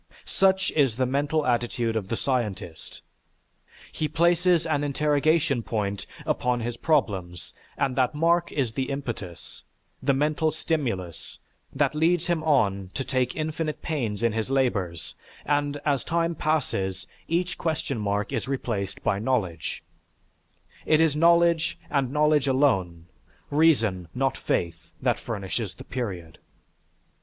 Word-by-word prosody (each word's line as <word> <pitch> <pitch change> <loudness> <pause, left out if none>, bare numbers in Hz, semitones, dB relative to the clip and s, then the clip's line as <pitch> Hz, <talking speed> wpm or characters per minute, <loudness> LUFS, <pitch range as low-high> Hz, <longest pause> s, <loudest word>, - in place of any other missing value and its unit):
Such 190 0 +2
is 135 -7 +2
the 130 +1 +1
mental 145 +4 0
attitude 120 -2 0
of 105 -4 -2
the 115 - -1
scientist. 105 - -3 0.9
He 155 - -1
places 170 +2 +3
an 150 -3 0
interrogation 150 0 +2
point 100 -3 -3 0.2
upon 125 -1 0
his 120 +1 -3
problems 95 - -1 0.2
and 135 -2 0
that 130 +2 +1
mark 170 +2 +2
is 130 -6 0
the 130 +1 -2
impetus, 120 -11 -6 0.4
the 140 - +2
mental 150 +3 +1
stimulus, 95 - -3 0.3
that 140 0 +1
leads 165 +2 +2
him 170 -3 0
on 100 -11 +2
to 135 - -1
take 130 -2 0
infinite 155 0 -3
pains 115 -9 -2
in 115 - +3
his 110 +2 -2
labors 100 -11 -1 0.3
and, 145 0 0
as 140 -3 +1
time 170 0 0
passes, 100 - -1 0.2
each 180 +2 -1
question 155 -6 -2
mark 105 +3 -1
is 120 +1 -2
replaced 115 -7 -3
by 100 - +1
knowledge; 100 -9 -1 1.0
it 155 - +3
is 160 -3 +3
knowledge 170 0 +4
and 135 -3 +1
knowledge 150 -1 +3
alone, 95 - +1 0.5
reason 115 - +3
not 135 0 +1
faith, 85 0 -2
that - - +1
furnishes 100 -1 -4
the - - -10
period. 95 -10 -5
135 Hz, 130 wpm, -26 LUFS, 105-155 Hz, 1.0 s, knowledge